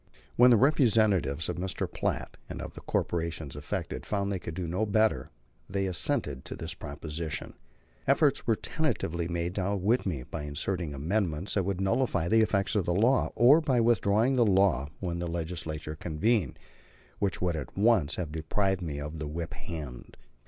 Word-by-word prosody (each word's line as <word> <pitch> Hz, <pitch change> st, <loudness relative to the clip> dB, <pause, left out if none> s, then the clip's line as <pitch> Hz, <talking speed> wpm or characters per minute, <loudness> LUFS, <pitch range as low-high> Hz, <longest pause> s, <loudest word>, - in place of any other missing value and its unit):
When 125 Hz, +1 st, +7 dB
the 120 Hz, -, +7 dB
representatives 105 Hz, -, +3 dB
of -, -, -3 dB
Mr. 95 Hz, +1 st, -2 dB
Platt -, -, -3 dB
and -, -, -6 dB
of -, -, -6 dB
the -, -, -10 dB
corporations 80 Hz, -4 st, -2 dB
affected -, -, -4 dB
found 100 Hz, -1 st, -1 dB
they 95 Hz, -, -1 dB
could 80 Hz, -1 st, -7 dB
do 90 Hz, -1 st, -3 dB
no 90 Hz, +6 st, -1 dB
better, 110 Hz, -, +2 dB, 0.4 s
they 95 Hz, +1 st, -1 dB
assented 75 Hz, -7 st, 0 dB
to -, -, -6 dB
this -, -, -5 dB
proposition. 75 Hz, +2 st, -5 dB, 0.5 s
Efforts 140 Hz, 0 st, +3 dB
were 115 Hz, -, +4 dB
tentatively 85 Hz, -, -2 dB
made 85 Hz, 0 st, -2 dB
to 95 Hz, -, -2 dB
outwit 100 Hz, +5 st, +1 dB
me, 75 Hz, -9 st, -2 dB
by 75 Hz, +3 st, -6 dB
inserting 75 Hz, +2 st, -3 dB
amendments 85 Hz, +3 st, -1 dB
that 100 Hz, -3 st, +1 dB
would 100 Hz, -1 st, -1 dB
nullify 95 Hz, -3 st, +1 dB
the 110 Hz, +4 st, +4 dB
effect 105 Hz, -2 st, +1 dB
of 100 Hz, -5 st, +1 dB
the 85 Hz, -, 0 dB
law, 120 Hz, +7 st, +3 dB
or 140 Hz, +7 st, +7 dB
by 135 Hz, -6 st, +2 dB
withdrawing 115 Hz, +2 st, +3 dB
the 120 Hz, -, +5 dB
law 95 Hz, -, +3 dB
when 85 Hz, -2 st, -2 dB
the 85 Hz, -, -2 dB
Legislature 80 Hz, -2 st, -4 dB
convened; 90 Hz, -, 0 dB, 0.6 s
which 100 Hz, -3 st, 0 dB
would 90 Hz, -2 st, 0 dB
at 75 Hz, 0 st, -6 dB
once 100 Hz, -8 st, +3 dB
have 85 Hz, -4 st, -4 dB
deprived 95 Hz, +5 st, 0 dB
me 75 Hz, -4 st, -4 dB
of 75 Hz, +2 st, -6 dB
the 75 Hz, -, -3 dB
whip 80 Hz, +1 st, -5 dB
hand. 75 Hz, -8 st, -8 dB
90 Hz, 175 wpm, -29 LUFS, 80-110 Hz, 0.6 s, When